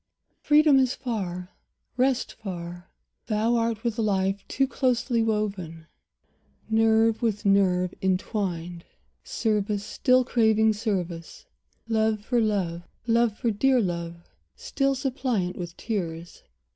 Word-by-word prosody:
Freedom 300 -2 +5
is 260 -1 +1
far, 185 -8 -4 0.4
rest 255 0 +1
far. 175 -4 -7 0.4
Thou 220 +2 +1
art 230 -1 -1
with 235 -1 -2
life 195 -2 0
Too 270 0 +1
closely 250 -3 0
woven, 200 -7 -2 0.8
nerve 225 0 +3
with 220 -3 -1
nerve 185 -2 +3
intwined; 180 -3 -2 0.4
Service 210 -2 -1
still 255 +3 +3
craving 220 -2 +3
service, 185 - -4 0.4
love 220 -1 +1
for 240 -1 +1
love, 190 -6 -1 0.2
Love 230 -2 +2
for 235 - 0
dear 260 +5 +3
love, 170 -4 -2 0.4
still 275 -1 -1
suppliant 250 -9 -1
with 175 -1 -7
tears. 170 -6 -4
215 Hz, 110 wpm, -26 LUFS, 185-235 Hz, 0.8 s, Freedom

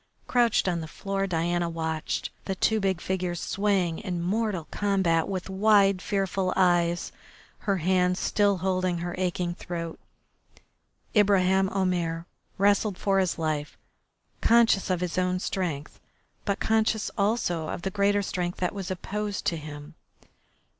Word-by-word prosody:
Crouched 240 -5 +2
on 175 -2 0
the 160 - -6
floor 195 +4 -3
Diana 175 0 0
watched 160 -1 -3
the 190 - -2
two 220 +4 +2
big 190 -3 0
figures 180 -2 -2
swaying 195 -5 0
in 180 -4 -3
mortal 190 -1 -1
combat 190 -5 +1
with 185 -2 -3
wide, 195 -1 +4
fearful 195 -2 -1
eyes, 175 -2 +2 0.5
her 200 -2 0
hands 180 +1 +2
still 205 -2 +2
holding 185 -2 +1
her 175 +1 -4
aching 180 -1 -1
throat. 170 -2 -6 1.2
Ibraheim 190 -2 +4
Omair 175 -4 -1 0.3
wrestled 200 0 +2
for 195 -1 +2
his 185 -3 0
life, 155 -2 -2 0.6
conscious 230 -5 +4
of 180 -1 0
his 180 0 -1
own 180 0 +1
strength, 170 -6 -3 0.5
but 200 -2 0
conscious 220 -1 +1
also 200 -6 0
of 175 - -5
the 195 - -2
greater 200 +1 +2
strength 180 -2 -3
that 180 - -1
was 195 -3 -5
opposed 205 +2 -3
to 170 - +1
him. 150 0 -8
185 Hz, 140 wpm, -27 LUFS, 175-200 Hz, 1.2 s, wide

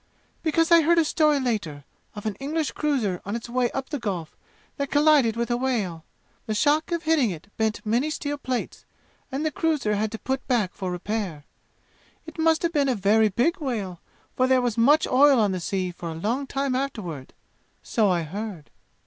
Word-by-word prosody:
"Because 330 +1 +1
I 335 -1 +8
heard 335 +2 +3
a 330 - +4
story 300 -2 +3
later, 200 - -2 0.3
of 210 - -8
an 215 - -1
English 305 +2 -2
cruiser 245 -12 -1
on 200 +3 -4
its 235 - -5
way 245 0 +1
up 270 -1 -5
the 290 - -3
Gulf, 185 -8 -4 0.4
that 280 -1 -2
collided 290 -6 +4
with 235 +1 -2
a 240 - +2
whale. 215 -11 -2 0.4
The 215 - -1
shock 300 +8 +2
of 340 -1 -1
hitting 310 -7 +3
it 180 +3 -8
bent 220 -1 -1
many 240 +8 +1
steel 290 -1 -3
plates, 255 -3 -4 0.5
and 275 +4 -2
the 310 - +1
cruiser 300 -10 0
had 210 +1 -1
to - - -3
put 265 +3 -3
back 225 -8 +1
for 190 -2 -4
repair. 180 -4 -4 0.8
It 320 0 -11
must 320 +1 +3
have 340 0 0
been 285 -3 +2
a 255 - +1
very 210 +2 +3
big 245 - +1
whale, 210 - -3 0.4
for 255 - +2
there 260 0 +4
was 245 -3 0
much 290 +7 +4
oil 275 0 +5
on 210 -3 +3
the 185 - -2
sea 185 +1 -2
for 170 -1 -7
a 160 - -5
long 235 - -2
time 275 -1 -1
afterward. 205 - -4 0.5
So 220 -4 +1
I 175 -2 +1
heard. 190 -1 -7
240 Hz, 200 wpm, -25 LUFS, 205-290 Hz, 0.8 s, I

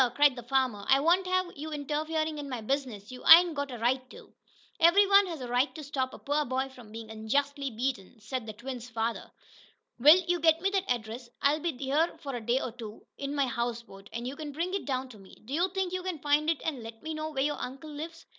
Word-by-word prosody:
cried 290 -2 +5
the 245 - -7
farmer. 250 -4 0
"I 270 - +6
won't 350 +5 +3
have 370 -1 0
you 305 +2 -6
interferin' 310 +1 -2
in 285 -1 -6
my 250 -2 -3
business! 235 -3 -3
You 250 - -10
ain't 340 +1 +9
got 285 -1 -3
a 245 - -6
right 245 +3 +1
to!" - - -14 0.5
"Every 340 +5 +6
one 395 0 +6
has 330 -6 -6
a 250 - -5
right 245 +4 +1
to 310 - -7
stop 265 -2 -2
a - - -10
poor 290 +1 0
boy 265 0 -2
from 245 -5 -14
being 225 0 -8
unjustly 275 +6 -1
beaten," 235 -3 -4
said 225 +2 -5
the 215 - -5
twins' 245 +2 -7
father. 225 0 -3 0.7
"Will, 300 +7 +9
you 350 0 +1
get 320 0 +4
me 390 +3 0
that 390 -1 -1
address. 235 0 -3
I'll 290 +2 +3
be 325 -4 -3
here 285 +5 0
a 260 -4 -4
day 240 +4 +1
or 250 - -4
so, 220 -1 -8 0.2
in 280 +1 -3
my 280 -1 +2
houseboat, 235 -5 -4
and 235 +1 -4
you 265 - -5
can 300 0 -6
bring 340 +6 -3
it 395 - -2
down 260 -1 -2
to 220 -4 -13
me. 190 -1 -15
Do 260 - -7
you 350 +5 +2
think 380 -1 -2
you 370 - -1
can 365 -2 -3
find 295 +2 +2
it, 330 - 0
and 295 -6 -2
let 225 0 -10
me 315 0 -4
know 310 0 -4
where 270 -3 -1
your 295 +1 -1
uncle 270 +4 -7
lives?" 325 +3 -8
275 Hz, 240 wpm, -29 LUFS, 240-315 Hz, 0.7 s, ain't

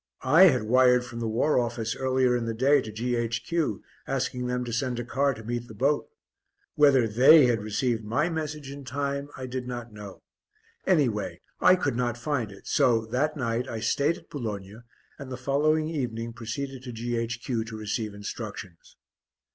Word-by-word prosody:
I 160 +8 +7
had 130 -10 +4
wired 125 +2 +4
from 115 -1 -8
the 115 - -2
War 125 +6 +2
Office 115 -2 -2
earlier 130 -1 +2
in 120 -1 -1
the 115 -1 -3
day 135 +4 +4
to 110 - -7
G.H.Q., 120 +4 -1 0.2
asking 125 0 -2
them 125 0 -1
to 120 - -5
send 125 +1 -1
a 120 - -4
car 135 +2 +1
to 110 - -10
meet 120 +1 -4
the 110 - -11
boat. 140 +7 +1 0.6
Whether 140 -6 +5
they 130 +7 +7
had 120 -3 +1
received 110 +2 -1
my 125 +9 0
message 150 -4 -4
in 140 0 -8
time 140 +2 -3
I 130 - -5
did 130 0 -5
not 120 -2 -6
know 105 -2 -10 0.6
anyway 105 - +1 0.2
I 185 - +6
could 145 -8 -1
not 120 -1 -1
find 125 -5 -2
it, 100 - -14
so, 115 -3 +2
that 150 +5 0
night, 120 -1 -1
I 115 - -4
stayed 145 +8 +1
at 165 - -19
Boulogne, 110 - -6 0.3
and 135 -2 -8
the 125 - -4
following 150 +4 +1
evening 115 -7 -3
proceeded 125 +4 -5
to 125 -1 -7
G.H.Q. 120 0 -2
to 115 -1 -7
receive 105 0 -3
instructions. 100 -4 -8
125 Hz, 180 wpm, -27 LUFS, 115-140 Hz, 0.6 s, I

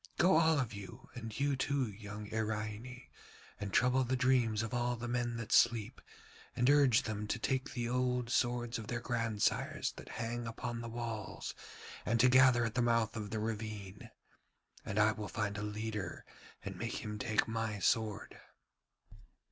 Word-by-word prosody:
Go 180 -2 +5
all 160 -1 +4
of 120 -5 -1
you, 100 +5 -10
and 115 -3 -6
thou 140 +5 0
too, 135 0 0
young 105 0 -7
Iraine, 110 +3 -3 0.6
and 105 -1 -4
trouble 125 +4 +4
the 130 +1 0
dreams 125 -4 +2
of 115 - -5
all 120 0 +1
the 120 +1 -5
men 120 -1 -1
that 115 -2 -6
sleep, 120 0 +3 0.5
and 120 - +2
urge 140 -5 +5
them 105 -1 -3
to 120 - -1
take 130 +3 -1
the 120 -2 -2
old 125 -1 0
swords 120 -1 +1
of 110 - -7
their 120 +1 -2
grandsires 115 -3 0
that - - -10
hang 120 +1 -3
upon 115 +1 -4
the 115 - -5
walls, 115 -3 -5 0.5
and 115 +3 +1
to 125 +2 +6
gather 130 -2 +6
at 110 - -2
the 125 - +1
mouth 115 -1 +2
of 105 -2 -4
the 110 - -3
ravine; 105 -3 -5 0.7
and 100 - -4
I 110 +1 +5
will 105 -1 -5
find 105 -2 -2
a 105 - -3
leader 105 -3 -4 0.4
and - - -5
make - - -3
him 105 0 -5
take 110 -1 +1
my 110 -2 -2
sword.' 110 +2 0
115 Hz, 170 wpm, -34 LUFS, 110-125 Hz, 0.7 s, to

